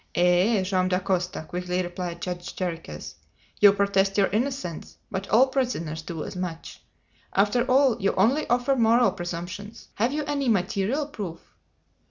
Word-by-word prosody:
"Eh! 180 +4 +3
Joam 185 -1 +1
Dacosta," 180 -2 -1
quickly 180 +1 -2
replied 175 -1 -5
Judge 175 -1 -5
Jarriquez. 165 - -5 0.5
"You 205 -1 +8
protest 200 0 +1
your 200 - +4
innocence; 235 - -3
but 190 +1 -4
all 235 +6 +6
prisoners 240 - -2
do 160 -1 -6
as - - -7
much! 180 -3 -6 0.5
After 210 +5 +3
all, 255 -3 +4
you 195 - +2
only 250 +11 +2
offer 245 +3 +2
moral 235 -2 +4
presumptions. 175 +3 -7
Have 235 +5 0
you 300 +1 -1
any 280 -3 -1
material 205 +7 0
proof?" 200 - -6
195 Hz, 145 wpm, -25 LUFS, 180-235 Hz, 0.5 s, You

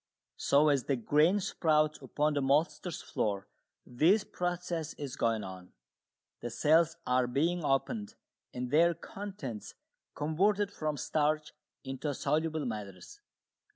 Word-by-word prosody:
So 145 +2 +4
as 140 -3 +2
the 140 - +1
grain 150 - +3
sprouts 155 -5 +1
upon 150 +1 0
the 145 - 0
maltster's 150 +5 0
floor 100 -2 -2 0.4
this 165 - +3
process 175 -4 -3
is 140 -3 -6
going 115 -4 0
on 95 -1 -9 0.7
the 120 - -4
cells 160 +7 +3
are 125 0 +2
being 165 +7 0
opened 210 - -1 0.4
and 125 0 -4
their 170 +3 +5
contents 170 - -7 0.4
converted 195 +7 +1
from 155 -5 -3
starch 150 +2 0 0.3
into 135 +2 -3
soluble 155 0 0
matters. 100 -6 -7
150 Hz, 120 wpm, -31 LUFS, 130-170 Hz, 0.7 s, their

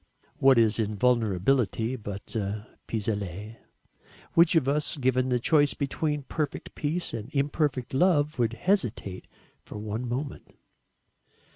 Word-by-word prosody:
What 135 -1 +5
is 115 -1 +3
invulnerability 115 +2 +1
but 105 -4 -8
a 105 0 -2 0.2
pis 110 -3 -3
aller? 105 +1 -4 0.8
Which 170 +1 +5
of 150 -5 +3
us, 150 +2 0
given 130 -1 +1
the 125 -1 +2
choice 145 +3 +3
between 150 +1 -1
perfect 150 +2 -4
peace 160 +4 -2
and 115 0 -5
imperfect 140 -3 0
love 150 -2 +2
would 115 -1 +2
hesitate 120 - -1 0.4
for - - -9
one 110 +3 -4
moment? 135 +4 -5
125 Hz, 125 wpm, -27 LUFS, 110-145 Hz, 0.8 s, What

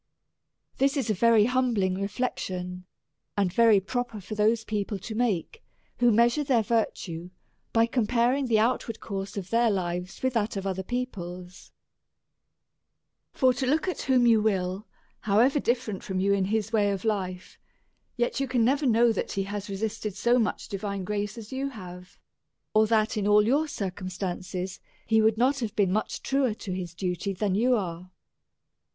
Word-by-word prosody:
This 275 +2 +2
is 240 -5 0
a - - +2
very 225 +1 +4
humbling 240 -7 +1
reflection, 185 -4 -3 0.5
and 190 -3 +1
very 225 -3 +6
pro 245 +6 -2
per 230 -3 -10
for 200 +3 -8
those 215 +2 +2
people 210 -2 -2
to 215 +4 -7
make, 230 - -1 0.4
who 240 -1 +5
measure 235 +6 +3
their 250 -5 +2
vir 225 +1 +2
tue 170 0 -7 0.4
by 225 0 +4
comparing 245 +3 +1
the 225 -2 +3
outward 230 0 0
course 195 -1 -5
of 190 -2 -5
their 230 0 +3
lives 180 -1 -3
with 260 -1 +1
that 215 -3 -1
of 195 - -4
other 190 -1 -2
people's: 185 -6 -6 1.6
for 255 -2 +3
look 295 +7 +1
at 365 - -2
whom 255 -2 +3
you 225 -2 +5
will, 195 -1 -1 0.3
however 235 +8 +3
ditferent 240 -6 -1
from 190 -6 -3
you 200 +1 +2
in 195 -1 +1
his 220 +2 -1
way 205 -2 +3
of 200 +1 -3
life, 185 -4 -3 0.6
yet 240 +2 0
you 275 - 0
can 245 -3 +2
never 280 +3 +2
know 235 0 +4
that 220 - -3
he 195 - -1
has 205 +1 -5
resisted 210 0 -3
so 240 +1 +3
much 220 - -1
divine 200 -1 -4
grace 205 +3 -3
as 225 0 -9
you 270 +1 -2
have; 180 -6 -11 0.6
or 215 0 +4
that, 220 0 +2
in 205 -1 0
all 210 0 +5
your 285 +7 +2
circum 190 -7 -4
stances, 185 0 -4 0.3
he 220 0 +3
would 220 0 +3
not 265 +4 +2
have 225 -3 -4
been 195 -3 +2
much 215 - -2
truer 270 -5 +1
to 200 - -7
his 175 -2 -5
duty 180 +2 -2
than 195 0 -1
you 245 +6 +3
are. 180 -4 -4
215 Hz, 175 wpm, -27 LUFS, 190-240 Hz, 1.6 s, very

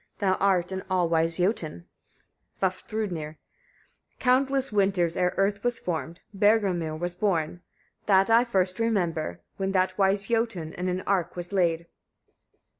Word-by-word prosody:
Thou 195 -2 +2
art 190 -2 +2
an 190 0 -3
all 180 -2 +2
wise 165 0 +1
Jötun. 175 - -1 0.8
Vafthrûdnir. 185 -4 -3 0.8
35. - - -40
Countless 265 +1 +2
winters, 195 -4 +1
ere 180 0 +1
earth 200 +1 +1
was 245 -1 +2
formed, 165 -1 -4
Bergelmir 195 -6 +2
was 175 +1 -2
born. 175 -3 -1 0.5
That 195 -1 +5
I 230 +1 +6
first 190 -5 0
remember, 175 - -1 0.2
when 195 0 -2
that 185 +1 +1
wise 195 +1 +2
Jötun 225 -8 -1
in 180 +1 -4
an 180 +1 -2
ark 185 -4 -1
was 175 +2 -5
laid. 170 -3 +1
185 Hz, 140 wpm, -26 LUFS, 170-205 Hz, 0.8 s, I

